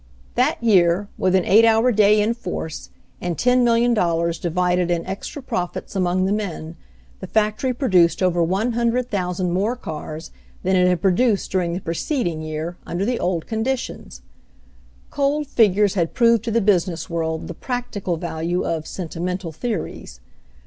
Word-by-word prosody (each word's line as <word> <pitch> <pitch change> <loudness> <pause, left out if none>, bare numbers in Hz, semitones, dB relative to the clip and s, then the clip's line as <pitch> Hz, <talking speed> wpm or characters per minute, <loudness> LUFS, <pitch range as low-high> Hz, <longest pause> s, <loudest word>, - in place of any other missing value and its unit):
That - - +2
year, 190 -2 +3
with 185 0 +2
an 185 - +2
eight 220 +3 +6
hour 225 +2 +4
day 210 -1 +4
in 215 +3 +2
force, 180 -8 -6 0.3
and 175 -3 -2
$10,000,000 230 -9 +2
divided 180 +1 +1
in 170 -1 0
extra 195 +9 -6
profits 180 -4 -4
among 185 0 +1
the 190 - 0
men, 175 -6 -3 0.4
the 190 - -7
factory 215 +5 +1
produced 185 - +2
over 175 -1 +2
100,000 200 -2 0
more 200 +7 0
cars 155 -6 -7 0.3
than 190 +1 +2
it 180 0 +4
had 180 -2 +1
produced 200 +3 +2
during 180 -3 0
the 180 - -3
preceding 170 - -2
year, 155 +2 -5
under 180 +3 -3
the 245 +1 -1
old 175 -3 -1
conditions. 235 +4 -4 0.9
Cold 290 +1 0
figures 210 -5 +3
had 170 -4 -1
proved 235 -3 +4
to - - -1
the 230 +1 +2
business 180 -5 +1
world 160 -1 -3
the - - -6
"practical" 215 -6 -3
value 170 +1 -2
of 160 -2 -2
"sentimental 180 0 -4
theories." 180 - -5
185 Hz, 150 wpm, -21 LUFS, 170-225 Hz, 0.9 s, eight